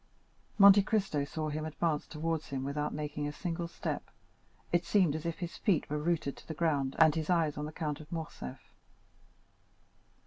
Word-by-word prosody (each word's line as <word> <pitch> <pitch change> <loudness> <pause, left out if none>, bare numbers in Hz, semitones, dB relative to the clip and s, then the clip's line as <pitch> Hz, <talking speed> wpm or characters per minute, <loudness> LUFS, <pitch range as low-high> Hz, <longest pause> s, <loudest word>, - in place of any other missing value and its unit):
Monte 200 -1 +9
Cristo 195 -8 0
saw 155 +2 -3
him 155 +1 -3
advance 155 -1 -1
towards 160 0 -2
him 135 -1 -3
without 145 +2 -2
making 150 -1 -3
a - - -3
single 170 +1 -3
step. - - -4 0.6
It 175 0 +3
seemed 170 -3 +3
as 160 +1 -3
if 165 - -3
his 175 -2 -5
feet 190 -8 +1
were 150 - 0
rooted 155 -3 0
to - - -15
the 160 - -5
ground, 145 -5 +1
and 160 -2 +6
his 160 +1 -3
eyes 165 -4 +2
on 150 - -3
the 155 - -5
Count 150 -3 -3
of 155 - -12
Morcerf. 160 - -7
155 Hz, 180 wpm, -32 LUFS, 150-170 Hz, 0.6 s, Monte